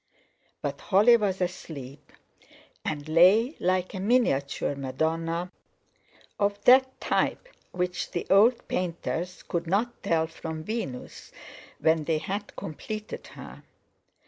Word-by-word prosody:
But - - -3
Holly 215 +4 +5
was 200 -4 0
asleep, 145 -6 -6 0.7
and 150 -1 -4
lay 190 - +5
like 185 0 0
a 190 - -4
miniature 190 - +1
Madonna, 165 +6 -2 0.9
of 205 0 +1
that 260 +1 +5
type - - 0 0.2
which 180 0 -2
the 175 - -3
old 220 +5 +5
painters 175 0 -3
could 170 -1 -3
not 220 +7 0
tell 160 -1 +1
from 160 -1 -7
Venus, 190 - -5 0.5
when 160 -1 +2
they 160 0 +1
had 200 +6 -5
completed 215 +7 -6
her. - - -11
180 Hz, 115 wpm, -27 LUFS, 160-205 Hz, 0.9 s, Holly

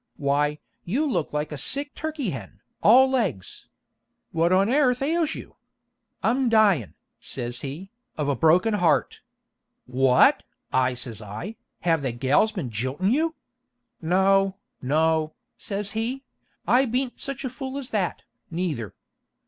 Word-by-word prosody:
Why, 145 +1 +1 0.3
you 255 - 0
look 200 - -1
like 150 +1 -2
a 150 - -4
sick 285 - -1
turkey 305 - -3
hen, 105 -6 -8 0.2
all 255 +5 +7
legs! 215 - -2 0.6
What 165 +2 +2
on 190 +2 +4
airth 255 0 +2
ails 320 +1 0
you?' - - -10 0.7
'I'm 250 +2 +2
dyin', 205 - +3 0.2
says 120 -1 -4
he, 155 +8 -7 0.3
'of 150 -2 -1
a 140 - +1
broken 175 - +4
heart.' 165 -9 +1 0.6
'What!' 125 0 +4 0.3
I 130 -1 +2
says 120 -3 -5
I, 110 - -7 0.3
'have 165 -3 +2
the 130 -4 -2
gals 135 - +2
been 165 - -5
jiltin' 130 - -1
you?' 320 +3 0 0.7
'No, 190 +3 +3 0.3
no,' 155 +3 +1 0.2
says 200 0 -3
he; 235 +5 -3 0.4
'I 255 +3 +5
beant 250 +2 -2
such 275 0 -4
a - - -1
fool 265 +1 -6
as 275 -2 -5
that, 195 -6 -1 0.3
neither.' 160 - -3
180 Hz, 140 wpm, -25 LUFS, -, 0.7 s, all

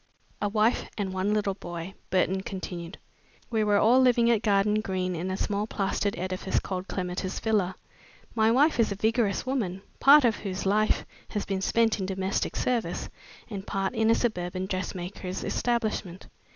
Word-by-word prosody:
"A 205 - +1
wife 215 +3 +1
and 195 -3 -2
one 190 +2 0
little 210 -2 +1
boy," 175 -1 -7 0.2
Burton 190 0 +1
continued. 180 -2 -6 0.5
"We 220 -2 +2
were 205 -1 +3
living 240 0 +5
at 225 -3 +2
Garden 210 0 +2
Green 185 -3 -2
in 175 +3 -3
a 190 - -2
small 205 +1 -1
plastered 200 0 -1
edifice 185 +1 -2
called 185 0 -4
Clematis 185 0 -3
Villa. 205 -5 +1 0.6
My 220 -1 +3
wife 275 +5 +3
is 225 - +3
a - - -1
vigorous 220 0 +1
woman, 205 -8 -2 0.2
part 285 0 +8
of 225 -3 +2
whose 195 -1 -4
life 215 +2 +2 0.2
has 210 - -3
been 195 -1 -2
spent 225 +2 +2
in 190 - -2
domestic 190 0 -1
service, 245 -3 -1 0.4
and 200 -3 -7
part 195 -1 -1
in 220 0 +2
a 230 - +6
suburban 185 -5 -1
dressmaker's 185 0 -4
establishment. 215 -6 -1
200 Hz, 165 wpm, -27 LUFS, 185-220 Hz, 0.6 s, part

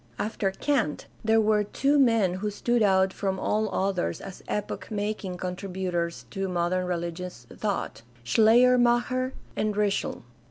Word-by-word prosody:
After 210 -2 -1
Kant 225 - -1 0.2
there 225 0 +4
were 215 -1 +3
two 275 +7 +1
men 230 -8 +4
who 210 - 0
stood 240 +3 0
out 190 -2 +3
from 190 -1 -2
all 215 +2 0
others 185 - -1
as 190 - -9
epoch 210 -1 -4
making 205 -3 -3
contributors 180 -2 -3
to 195 -1 -2
modern 180 +1 0
religious 175 +1 -4
thought 195 - -3
— 120 -1 -27
Schleiermacher 245 - +4 0.2
and 215 -1 0
Ritschl. 205 -1 -1
200 Hz, 135 wpm, -27 LUFS, 180-220 Hz, 0.2 s, there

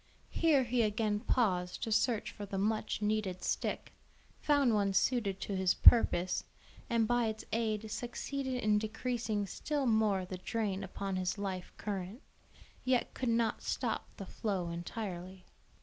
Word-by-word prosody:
Here 305 -5 +3
he 245 0 +1
again 210 -1 +1
paused 185 -7 0
to 225 - -2
search 220 0 +1
for 205 - -8
the 195 - -4
much 215 +1 -1
needed 210 -4 -1
stick, - - -2 0.5
found 285 -5 +3
one 200 -2 +2
suited 200 -1 +1
to 200 - -3
his 190 -1 +2
purpose, 185 -6 +5 0.5
and 230 -2 +2
by 240 -1 +2
its 220 0 -4
aid 220 -1 -1
succeeded 260 +3 -3
in 210 -1 +4
decreasing 220 -1 -2
still 290 +7 -2
more 215 -5 +2
the 185 0 -6
drain 200 -1 -2
upon 195 0 -4
his 185 +1 -1
life 190 -3 -4
current; 205 - -5 0.6
yet 255 -1 +1
could 255 - -2
not 230 -1 +1
stop - - -2
the 195 - -6
flow 190 -3 -2
entirely. 180 +1 -6
215 Hz, 150 wpm, -33 LUFS, 190-235 Hz, 0.6 s, purpose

